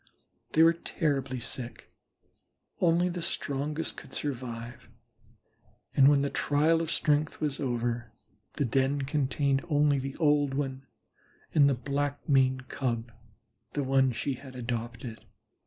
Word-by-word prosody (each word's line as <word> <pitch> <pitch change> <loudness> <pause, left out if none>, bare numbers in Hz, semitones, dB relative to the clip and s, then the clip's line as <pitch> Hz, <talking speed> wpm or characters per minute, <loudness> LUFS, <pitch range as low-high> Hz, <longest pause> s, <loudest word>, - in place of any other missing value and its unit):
They 160 - +6
were 165 +1 +7
terribly 140 -6 -1
sick; 120 +1 -7 0.9
only 175 +1 +3
the 175 -1 -3
strongest 150 -1 -2
could - - -10
survive, 120 -4 -5 1.1
and 135 -1 +7
when 140 -1 +5
the 140 - -1
trial 155 +3 +2
of 165 - -3
strength 150 0 +1
was 150 -3 -2
over, 120 -3 -2 0.4
the 145 - 0
den 135 +3 +1
contained 140 -1 +1
only 145 -2 +3
the 135 +1 -5
old 145 -4 +3
one 135 -1 -3 0.7
and 140 -2 +6
the 135 - +2
Black 145 +3 -2
maned 130 -2 +3
Cub, 120 -3 -2 0.6
the 145 - 0
one 135 -1 +3
she 135 +4 -2
had 130 0 -10
adopted. 115 -1 -5
135 Hz, 130 wpm, -29 LUFS, 130-145 Hz, 1.1 s, were